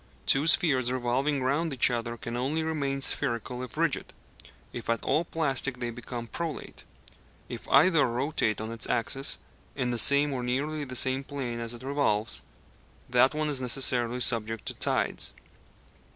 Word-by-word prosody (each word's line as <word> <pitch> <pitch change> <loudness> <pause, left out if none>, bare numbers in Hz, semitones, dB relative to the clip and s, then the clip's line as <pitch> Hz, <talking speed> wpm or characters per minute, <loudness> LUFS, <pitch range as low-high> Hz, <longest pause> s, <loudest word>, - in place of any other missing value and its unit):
Two 140 +4 +3
spheres 135 -8 +4
revolving 130 +3 -1
round 150 +5 0
each 130 -1 +2
other 120 0 -3
can 115 +1 -6
only 140 +6 -1
remain 140 -4 -2
spherical 125 -2 0
if 125 -4 -8
rigid; - - -1 0.6
if 120 - -7
at 115 -1 0
all 155 +5 +1
plastic 140 -5 -1
they 120 -1 -3
become 120 0 -7
prolate. 165 +5 -6 0.7
If - - -8
either 165 -5 +5
rotate 125 -2 -1
on 110 +1 -5
its 115 -1 -2
axis, 135 +5 0 0.4
in 125 -3 -1
the 120 - -1
same 140 +4 +7
or 130 - -3
nearly 145 +5 -2
the 130 -1 -8
same 130 +2 +4
plane 130 -4 -5
as 115 0 -3
it 120 - -12
revolves, 130 -6 0 0.7
that 125 +4 +4
one 155 0 -1
is 140 -3 0
necessarily 125 -1 +1
subject 115 -1 +2
to - - -4
tides. - - -1
130 Hz, 160 wpm, -27 LUFS, 120-140 Hz, 0.7 s, same